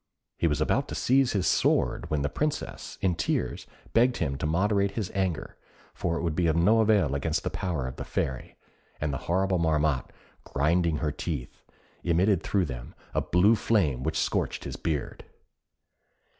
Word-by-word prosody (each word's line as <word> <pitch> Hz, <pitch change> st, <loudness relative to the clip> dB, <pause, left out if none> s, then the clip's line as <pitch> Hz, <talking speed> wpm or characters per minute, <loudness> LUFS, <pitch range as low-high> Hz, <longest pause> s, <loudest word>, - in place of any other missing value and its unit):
He 85 Hz, -, +3 dB
was 75 Hz, -2 st, 0 dB
about -, -, +1 dB
to -, -, -5 dB
seize 130 Hz, 0 st, +3 dB
his 95 Hz, -3 st, 0 dB
sword -, -, +2 dB
when 75 Hz, -2 st, 0 dB
the -, -, +2 dB
Princess, 150 Hz, -, -3 dB
in 95 Hz, -2 st, +2 dB
tears, 65 Hz, -5 st, -2 dB, 0.3 s
begged 120 Hz, +2 st, +4 dB
him 70 Hz, -4 st, -1 dB
to 75 Hz, -, -1 dB
moderate 100 Hz, +5 st, +2 dB
his 105 Hz, -4 st, -3 dB
anger, 95 Hz, -4 st, -2 dB, 0.4 s
for 85 Hz, -1 st, -1 dB
it -, -, -3 dB
would 85 Hz, -3 st, -1 dB
be 85 Hz, 0 st, +2 dB
of 80 Hz, -, +2 dB
no 105 Hz, +7 st, +4 dB
avail 105 Hz, -10 st, +3 dB
against 75 Hz, +3 st, -1 dB
the -, -, -2 dB
power 85 Hz, -8 st, -2 dB
of 65 Hz, -, -6 dB
the -, -, -4 dB
Fairy; 65 Hz, -2 st, -3 dB, 0.4 s
and 75 Hz, -1 st, -1 dB
the 70 Hz, -, -2 dB
horrible 95 Hz, +1 st, +2 dB
Marmotte, 75 Hz, -4 st, +1 dB, 0.3 s
grinding 80 Hz, +3 st, +1 dB
her 75 Hz, 0 st, -1 dB
teeth, 75 Hz, -4 st, -5 dB, 0.4 s
emitted 90 Hz, +2 st, +3 dB
through 100 Hz, -3 st, +1 dB
them -, -, -7 dB, 0.2 s
a -, -, +1 dB
blue 95 Hz, +6 st, +4 dB
flame 95 Hz, -, +1 dB
which -, -, -1 dB
scorched -, -, -1 dB
his -, -, -5 dB
beard. 75 Hz, -4 st, -3 dB
85 Hz, 175 wpm, -27 LUFS, 75-95 Hz, 0.4 s, begged